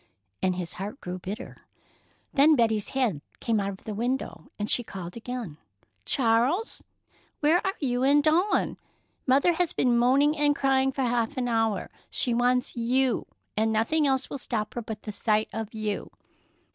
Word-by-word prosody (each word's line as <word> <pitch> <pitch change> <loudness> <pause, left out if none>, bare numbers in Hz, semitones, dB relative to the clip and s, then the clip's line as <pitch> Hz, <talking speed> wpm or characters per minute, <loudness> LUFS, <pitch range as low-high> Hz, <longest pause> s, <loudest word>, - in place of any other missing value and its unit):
and 185 -1 +1
his 180 -2 -4
heart 205 +8 -6
grew 180 +1 -6
bitter. 195 +4 -6 0.8
Then 300 +3 +6
Betty's 220 -4 +1
head 240 - 0 0.2
came 225 -2 +1
out 200 0 -1
of 195 -1 -8
the 215 - -5
window, 235 - -3
and 205 - -2
she 245 - +3
called 180 -5 -8
again: 230 -9 -6 0.5
"Charles, 255 - +1 0.6
where 320 +4 +3
are 385 0 -1
you 250 -4 0
and 285 +2 +4
Dawn? 345 +7 +2 0.5
Mother 280 +7 +4
has 340 0 0
been 245 -2 +2
moaning 270 +5 +4
and 290 -1 +2
crying 270 -1 +2
for 265 0 -2
half 240 +2 0
an 250 -1 0
hour. 225 -4 0 0.2
She 245 - 0
wants 245 +1 +1
you, 250 +2 +1 0.3
and 220 +1 +2
nothing 280 +8 +2
else 265 -1 +1
will 280 - -6
stop 220 -4 -3
her 240 - -3
but 220 -2 -7
the 215 - -5
sight 215 +1 +1
of 220 0 -4
you." 215 -2 -3
240 Hz, 170 wpm, -27 LUFS, 215-270 Hz, 0.8 s, Then